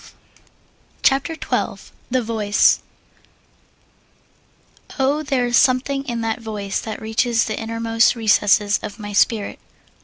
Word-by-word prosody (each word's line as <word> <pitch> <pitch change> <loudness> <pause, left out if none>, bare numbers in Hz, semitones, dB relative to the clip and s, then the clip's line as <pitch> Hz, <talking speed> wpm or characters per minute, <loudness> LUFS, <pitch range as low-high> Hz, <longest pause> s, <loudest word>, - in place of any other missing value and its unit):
] - - -36
CHAPTER 275 +5 +2
XII - - -3 0.2
THE 255 0 0
VOICE 215 -2 +2 2.2
Oh, 280 +2 +1
there 270 -4 0
is 240 0 0
something 275 +1 +2
in 235 -3 -3
that 225 +1 -2
voice 210 -3 -4
that 220 -2 -6
reaches 225 +1 0
The 215 - -4
innermost 230 +1 +1
recesses 210 -2 +3
of 210 - -7
my 205 -2 -7
spirit! 205 0 +1
230 Hz, 120 wpm, -20 LUFS, 215-255 Hz, 2.2 s, recesses